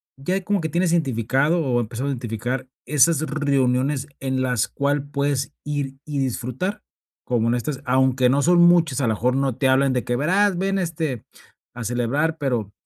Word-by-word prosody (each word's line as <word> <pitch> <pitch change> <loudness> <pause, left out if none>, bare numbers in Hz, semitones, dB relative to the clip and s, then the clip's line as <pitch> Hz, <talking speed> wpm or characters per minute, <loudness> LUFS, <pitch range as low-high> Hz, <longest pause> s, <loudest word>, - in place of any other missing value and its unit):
ya 160 +8 -2
ahí 195 - -1
como 195 0 0
que 160 - -2
tienes 170 +2 +1
identificado 135 +2 +1
o 125 -2 +1
empiezas 120 +3 -3
a - - -2
identificar, 125 +1 -3 0.2
esas 150 +2 +3
reuniones 140 -2 0
en 130 -1 -1
las 125 -4 0
cual 145 0 -1
puedes 140 0 -1
ir 145 -2 -3
y 145 -2 -3
disfrutar, 130 - -3 0.4
como 115 -2 0
en 120 - +2
estas 130 +3 -3
aunque 130 0 +3
no 140 +3 +2
son 175 +2 +4
muchas, 170 -6 +4
a 125 - +1
la 110 - +2
mejor 125 +4 0
no 135 -3 0
te 130 +1 +1
hablan 135 0 +3
de 125 - -1
que: 120 - -1
"Verás, 185 +7 +2
ven, 195 +1 0
este, 160 - -3 0.5
a 120 -1 -6
celebrar". 125 +8 0
Pero, 120 -8 -2
135 Hz, 185 wpm, -22 LUFS, 125-155 Hz, 0.5 s, son